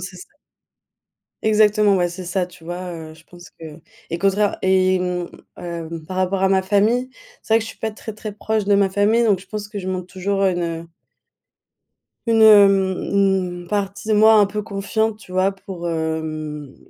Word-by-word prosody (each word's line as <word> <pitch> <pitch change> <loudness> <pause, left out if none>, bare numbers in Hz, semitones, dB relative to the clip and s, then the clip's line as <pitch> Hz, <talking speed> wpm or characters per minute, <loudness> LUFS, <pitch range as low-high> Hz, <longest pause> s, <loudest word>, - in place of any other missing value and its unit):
c'est - - -8
ça. - - -14 1.1
Exactement, 210 -1 +3
ouais, 175 -1 0
c'est 180 +1 -8
ça, 180 +1 -1
tu 180 -2 -17
vois, 175 +1 -6
heu, 160 -2 -9
je 160 +1 -19
pense 175 0 -15
que. 160 -1 -12 0.3
Et 170 - -2
contraire 200 +2 +1
et 185 0 +3
mmh, 180 -1 -3 0.3
hem, 165 -2 -6
par 185 +2 -5
rapport 185 +1 0
à 190 - +3
ma 190 -1 +3
famille, 210 +6 +1 0.3
c'est 220 - 0
vrai - - +6
que 230 - -4
je - - -7
suis - - -16
pas 220 - -2
très 220 +1 -8
très 215 0 -7
proche 215 +1 -2
de 205 - +4
ma 200 -1 +3
famille, 210 +4 +2
donc 205 -4 +3
je - - -16
pense 210 -1 -5
que 205 - -6
je 190 -1 -5
montre 185 -1 -3
toujours 195 +1 -1
une 170 -3 -1 1.4
une 225 -1 +3
hem, 195 -3 +6
une 190 -3 0
partie 200 +1 -3
de 220 - +2
moi 220 +1 +6
un 210 -1 +6
peu 210 +1 -4
confiante, 215 +2 -2
tu 200 -4 -14
vois? 185 +1 +2
Pour, 190 -3 -7
hem, 155 -3 -4
190 Hz, 195 wpm, -20 LUFS, 175-210 Hz, 1.4 s, vrai